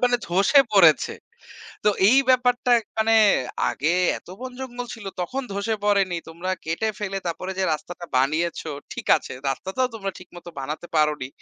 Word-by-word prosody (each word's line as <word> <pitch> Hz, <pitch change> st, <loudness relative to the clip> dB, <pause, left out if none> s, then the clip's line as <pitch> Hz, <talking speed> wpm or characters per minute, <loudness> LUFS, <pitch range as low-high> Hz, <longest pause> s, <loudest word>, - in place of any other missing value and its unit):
মানে 245 Hz, 0 st, +3 dB
ধ্বসে 195 Hz, -, +4 dB
পড়েছে। -, -, +5 dB, 0.7 s
তো -, -, +5 dB, 0.2 s
এই 260 Hz, -, +5 dB
ব্যাপারটা 250 Hz, 0 st, +2 dB, 0.3 s
মানে 225 Hz, +1 st, +3 dB, 0.6 s
আগে 150 Hz, -, -2 dB, 0.3 s
এত -, -, -24 dB
বন 260 Hz, -, -5 dB
জঙ্গল 245 Hz, -1 st, -6 dB
ছিল 215 Hz, -4 st, -11 dB
তখন 260 Hz, +10 st, -3 dB
ধ্বসে 200 Hz, +3 st, -1 dB
পড়েনি। 195 Hz, -4 st, +2 dB
তোমরা 170 Hz, +3 st, -5 dB
কেটে 165 Hz, +8 st, -1 dB
ফেলে 195 Hz, -1 st, -2 dB
তারপরে 185 Hz, +3 st, -3 dB
যে 190 Hz, -, +1 dB
রাস্তাটা 175 Hz, +3 st, -8 dB
বানিয়েছো, 155 Hz, +4 st, 0 dB, 0.2 s
ঠিক -, -, -7 dB
আছে, -, -, -8 dB, 0.2 s
রাস্তাটাও 195 Hz, -, -2 dB
তোমরা 195 Hz, -3 st, -3 dB
ঠিক 185 Hz, -, -14 dB
মতো 175 Hz, 0 st, -10 dB
বানাতে 150 Hz, +5 st, -5 dB
পারোনি। 150 Hz, -4 st, +1 dB
190 Hz, 160 wpm, -23 LUFS, 170-230 Hz, 0.7 s, পড়েছে